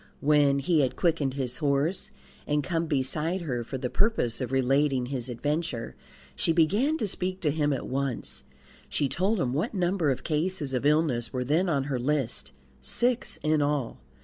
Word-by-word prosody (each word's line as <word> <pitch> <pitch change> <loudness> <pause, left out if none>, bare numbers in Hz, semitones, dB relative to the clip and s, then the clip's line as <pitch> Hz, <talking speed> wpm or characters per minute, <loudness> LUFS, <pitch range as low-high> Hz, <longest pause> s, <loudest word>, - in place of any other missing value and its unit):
When 145 -1 +4
he 155 +4 +2
had 130 -2 0
quickened 155 -6 +1
his 130 -3 -2
horse 145 +4 0 0.4
and 150 0 +1
come 165 +2 -1
beside 155 +6 -1
her 125 -8 -2
for 130 - -5
the 130 -1 -2
purpose 200 - +1
of 125 -1 -3
relating 135 0 +2
his 130 -1 -3
adventure, 145 0 -2 0.4
she - - +1
began 205 - +3
to 215 - -1
speak 185 0 -2
to 150 - +2
him 150 -1 +1
at 135 - -2
once. 125 - -3 0.5
She 145 - 0
told 190 - 0
him 125 -6 0
what 170 - -1
number 180 -3 +1
of 130 -1 -1
cases 155 -2 -1
of 130 +2 +1
illness 145 -7 +1
were 125 -1 -2
then 160 +8 +1
on 140 -4 +1
her 135 -2 -2
list 125 - -1 0.3
six 240 - 0
in 155 0 +2
all. 145 -4 -1
145 Hz, 175 wpm, -27 LUFS, 130-165 Hz, 0.5 s, When